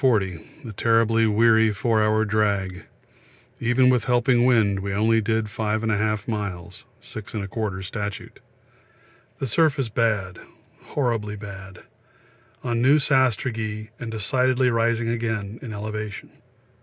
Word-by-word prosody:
40 105 - -1
a - - -6
terribly 115 +1 +2
weary 110 +1 +4
four 110 +2 +1
hour 110 +1 +2
drag; 100 -3 -1 0.7
even 120 +2 +3
with 125 -3 +3
helping 125 -1 +3
wind 110 -6 +3
we 100 +1 -4
only 110 +2 +3
did 110 0 0
5 110 +1 -2
1/2 110 -1 0
miles 100 -6 -5 0.2
(6 110 -2 -9
1/4 100 -2 -3
statute). 100 0 -6 1.0
The - - -3
surface 140 0 +2
bad, 105 -5 0 0.5
horribly 115 -7 -1
bad 100 -2 -10 0.8
on 120 -2 -1
new 135 +4 +5
sastrugi, 115 -6 0
and 115 - -5
decidedly 125 +4 +1
rising 115 0 +1
again 110 -2 -3
in 120 - -7
elevation. 105 0 -6
110 Hz, 120 wpm, -24 LUFS, 105-120 Hz, 1.0 s, new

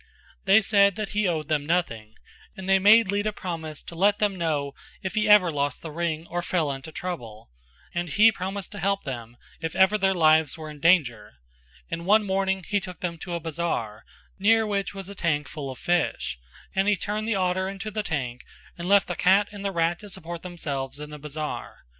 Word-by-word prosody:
They 200 +3 +6
said 200 -2 +4
that 215 -2 -4
he 210 0 +1
owed 155 -4 -1
them 155 -2 0
nothing, 115 -11 -1 0.4
and 190 0 -7
they 195 0 +5
made 210 +1 +6
Lita 205 +1 0
promise 165 -6 -6
to - - -10
let 200 +4 +3
them 205 -2 +1
know 150 -5 -1 0.3
if 190 +2 -4
ever 210 -4 +6
he - - -4
lost 145 -1 -2
the 160 - -6
ring 165 0 -2
or 175 +1 -3
fell 170 -4 0
into 135 +3 -7
trouble, 115 - -7 0.4
and 175 0 -2
he 215 +8 +6
promised 195 -1 -5
to 205 - -7
help 195 +2 0
them 120 -3 -7 0.2
if 165 -1 -4
ever 190 +3 +4
their 190 0 +2
lives 155 -3 +4
were 155 -1 -7
in 150 - -12
danger, 135 - +2 0.6
and 170 +1 -4
one 210 +1 +5
morning 190 -1 0
he 205 0 +1
took 180 -3 -9
them 170 -2 -3
to 175 - -6
a - - -2
bazar, 150 -10 -3 0.4
near 225 +3 +4
which 200 -1 -2
was 195 -2 -7
a 200 - -7
tank 160 -6 -1
full 145 -3 -6
of 130 - -7
fish, 175 - -1 0.3
and 195 +1 +1
he 210 - +4
turned 210 +3 -3
the 225 - +1
otter 185 0 0
into 195 +2 -6
the 215 +1 -2
tank 135 - -3 0.4
and 175 +2 -4
left 200 -1 +5
the 180 - -3
cat 195 +4 +4
and 205 -1 -8
the 200 - 0
rat 170 -1 0
to 205 - -10
support 170 -3 -7
themselves 145 -6 -4
in 150 0 -8
the 150 - -8
bazar. 150 - -6
175 Hz, 210 wpm, -25 LUFS, 155-195 Hz, 0.6 s, They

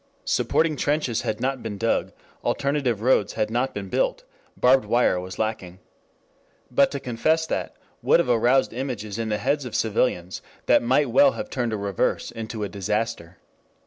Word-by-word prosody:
Supporting 160 -2 +1
trenches 145 -6 0
had 105 - -3
not 135 0 -1
been 105 -3 -5
dug, 115 +2 0 0.3
alternative 135 -6 0
roads 115 -5 +3
had 110 - -1
not 125 +3 0
been 100 -1 -6
built, - - 0 0.3
barbed 130 0 +4
wire 115 -4 +2
was 90 +1 -7
lacking. 100 -5 -3 0.9
But 140 +3 +4
to 140 - -4
confess 155 +7 0
that - - -3 0.3
would - - +4
have - - +1
aroused 125 +2 +3
images 115 -5 -4
in 115 -1 -2
the 105 - 0
heads 140 +5 0
of 125 -3 -6
civilians 100 -5 0 0.2
that - - +5
might 130 +5 +2
well 280 -1 +5
have 270 0 -6
turned 120 -3 -1
a 110 - -1
reverse 100 -2 -1
into 110 -1 -5
a - - -1
disaster. 100 -3 -3
115 Hz, 170 wpm, -24 LUFS, 105-135 Hz, 0.9 s, that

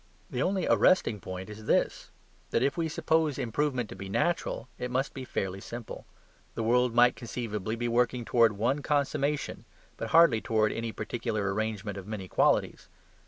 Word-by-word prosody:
The 125 - -2
only 190 +1 +1
arresting 150 - +3
point 95 0 -7
is 105 0 -10
this: - - +1 0.4
that 115 - +1
if 140 +1 +1
we 165 -2 -1
suppose 160 -2 +1
improvement 130 -1 -1
to - - -8
be 95 0 -7
natural, 170 - -1
it 125 - -3
must 130 +3 -1
be 130 - -6
fairly 95 -4 -3
simple. 120 +1 -8 0.5
The 115 - -2
world 125 +1 +2
might 120 0 +6
conceivably 110 -3 -4
be 120 +1 -2
working 120 0 +1
towards 115 -3 +4
one 120 +8 0
consummation, 145 0 -1 0.3
but - - -4
hardly 160 -9 +6
towards 110 -1 +1
any 115 0 -3
particular 110 -4 -2
arrangement 105 -1 -3
of 95 - -11
many 105 -3 -5
qualities. - - +1
120 Hz, 165 wpm, -29 LUFS, 110-135 Hz, 0.5 s, might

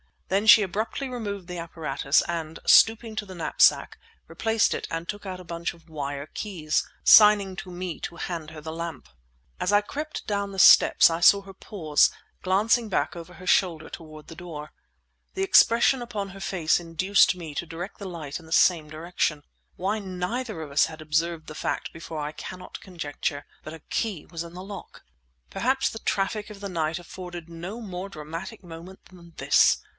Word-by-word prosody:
Then 200 +3 +1
she 220 -1 +9
abruptly 215 +8 -3
removed 205 -7 -5
the 180 -1 -6
apparatus, 155 -3 0
and, 160 -2 -4
stooping 225 0 +5
to 210 - -2
the 190 -2 -10
knapsack, 170 - +3 0.3
replaced 225 -1 +1
it - - -4
and 165 +1 -4
took 205 0 -6
out 185 -1 -6
a - - -11
bunch 170 0 -4
of 170 0 -21
wire 145 -2 -4
keys, 160 -5 -2 0.2
signing 210 -3 +7
to 195 - -7
me 180 -1 -5
to 170 - -6
hand 170 -3 -5
her 155 -1 -10
the 160 +1 -6
lamp. 165 -3 -6 0.5
As 190 - 0
I 205 - +6
crept 300 +8 -6
down 200 -1 -2
the - - -8
steps 185 - +7
I 165 - -2
saw 200 +3 +6
her 195 0 -12
pause, 160 -6 +2 0.3
glancing 215 +5 +2
back 185 - -1
over 170 +1 -9
her 185 - -12
shoulder 170 -3 +2
toward 155 -2 -11
the 165 - -10
door. 160 -3 -8 0.6
The 385 - -1
expression 255 -8 +5
upon 215 -5 -4
her 195 +1 -11
face 175 -3 +1
induced 175 +4 +3
me 165 -4 -8
to 170 - -3
direct 170 +4 -7
the 200 - -6
light 155 -4 -6
in 165 - -15
the 160 - -15
same 165 -5 +4
direction. 155 -1 -2 0.3
Why 195 +4 -1
neither 195 +2 -4
of 150 -3 -8
us 140 - +4
had 160 -1 -9
observed 160 +1 -1
the 155 - -7
fact - - -3
before 165 -1 -6
I 150 0 -3
cannot 180 +4 -9
conjecture; 145 -5 -4 0.2
but 155 - -8
a 160 - -9
key 195 0 -3
was 165 -1 -6
in 170 0 -11
the 180 +1 -8
lock! 195 -1 -10 0.5
Perhaps 265 +2 +1
the 225 - -7
traffic 210 +1 -1
of 205 -1 -11
the 200 - -5
night 160 -2 -1
afforded 175 -1 -9
no 175 +7 -7
more 190 -3 -6
dramatic 165 +3 -8
moment 175 +2 -11
than 170 -2 -16
this. - - +4
175 Hz, 190 wpm, -26 LUFS, 160-200 Hz, 0.6 s, she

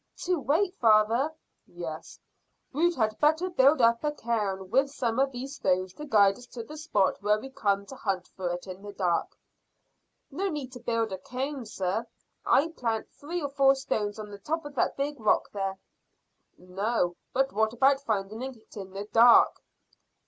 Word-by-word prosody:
"To 360 -2 +1
wait, 335 +7 +1
father?" 225 +5 +4 0.4
"Yes. 165 -3 -8 0.5
We 335 +5 +3
had 215 -4 0
better 315 +5 +2
build 280 -2 +4
up 230 +2 +4
a 300 - +1
cairn 205 -8 -2
with 270 +3 +3
some 245 -3 -2
of 270 0 +2
these 270 +3 -6
stones 185 0 0
to 300 - -8
guide 205 -5 +4
us 245 - -13
to 235 - -5
the 300 +7 -10
spot 300 - 0
when 210 +1 +2
we 270 - -9
come 200 -7 0
to 270 - -10
hunt 190 -6 -2
for 185 -2 -4
it 175 0 -4
in 185 0 -8
the 205 0 -9
dark." 180 -4 -1 0.9
"No 385 +8 -1
need 290 -6 -5
to 250 - -9
build 230 -2 -1
a 190 - -4
cairn, 260 +1 -4
sir, 205 +3 -2
if - - -25
I 305 +4 +4
plant 230 -8 -3
three 335 +3 -5
or 285 - -2
four 275 -1 +4
stones 215 -6 -2
on 210 -1 -8
the 200 - -9
top 315 +9 -3
of 290 - -8
that 265 - 0
big 285 0 -2
rock 215 -2 +2
there." 195 -1 -3 0.8
"No; 180 0 -1 0.2
but 270 +1 +1
what 220 +1 +2
about 270 +3 +3
finding 215 -2 -2
it 255 -4 -9
in 190 -2 -8
the 200 +1 -5
dark?" 230 +3 +6
230 Hz, 185 wpm, -28 LUFS, 200-275 Hz, 0.9 s, dark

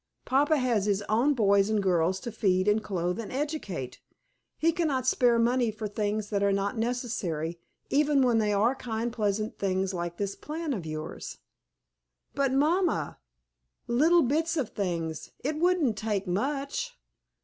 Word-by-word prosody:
Papa 290 +4 +3
has 240 -6 +1
his 205 0 +1
own 245 +7 +3
boys 200 -3 +3
and 215 -1 +2
girls 180 0 +2
to 235 - -5
feed 190 -3 +1
and 210 +1 +3
clothe 180 -1 -2
and 225 - -6
educate. 255 - -4 0.6
He 330 +1 +3
cannot 305 -7 0
spare 245 -2 +3
money 240 +1 +2
for 215 0 -4
things 210 0 -2
that 200 -1 0
are 200 0 +3
not 200 +1 0
necessary, 215 -9 -2 0.3
even 290 -1 +3
when 240 -3 +3
they 210 -1 +1
are 210 +5 +3
kind 235 -3 -3
pleasant 215 -1 -1
things 190 0 0
like 175 -1 -4
this 200 -1 -2
plan 310 -1 -4
of 180 -9 -5
yours." 155 0 -6 1.0
"But, 275 -2 +1
mamma 305 - +1 0.7
little 315 +8 +4
bits 320 +6 0
of 260 -8 -1
things! 170 -6 -3
It 300 +3 -1
wouldn't 330 - +2
take 210 -3 -1
much!" 280 - -2
220 Hz, 155 wpm, -28 LUFS, 195-275 Hz, 1.0 s, little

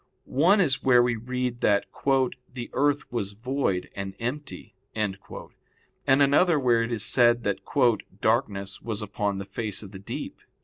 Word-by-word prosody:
One 175 +10 +3
is 135 -8 +2
where 125 -2 +5
we 120 -1 +1
read 125 +1 -3
that 100 -1 +3 0.7
"the 120 -2 -7
earth 145 +1 +1
was 105 -5 -3
void 115 -4 -1
and 95 -1 -5
empty," 130 +6 -5 0.2
and 105 -3 0 0.9
another 140 +5 +4
where 120 -3 +3
it 115 +1 -2
is 110 -3 -1
said 120 -1 +4
that 100 -2 -1 0.6
"darkness 105 -4 0
was 110 -2 -4
upon 100 -1 -2
the 100 - -5
face 105 +1 -4
of 100 - -10
the 95 - -9
deep." 100 - -6
120 Hz, 150 wpm, -26 LUFS, 100-130 Hz, 0.9 s, where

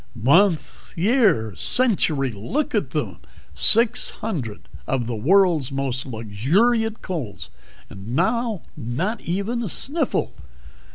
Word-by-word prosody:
"Month, 155 - +1
year, 185 - +2
century! 155 - +1
Look 115 - -3
at - - 0
them! - - -4 0.3
Six 230 +1 +4
hundred 135 - -5 0.3
of 130 -3 -1
the 120 0 -3
world's 165 - +3
most 135 -1 -3
luxuriant 170 - 0
colds, 130 - -6 0.4
and 100 +5 -8
now 220 - 0
not 155 - -3
even 200 +7 -2
a 220 - -3
sniffle." 285 - 0
165 Hz, 110 wpm, -22 LUFS, -, 0.4 s, Six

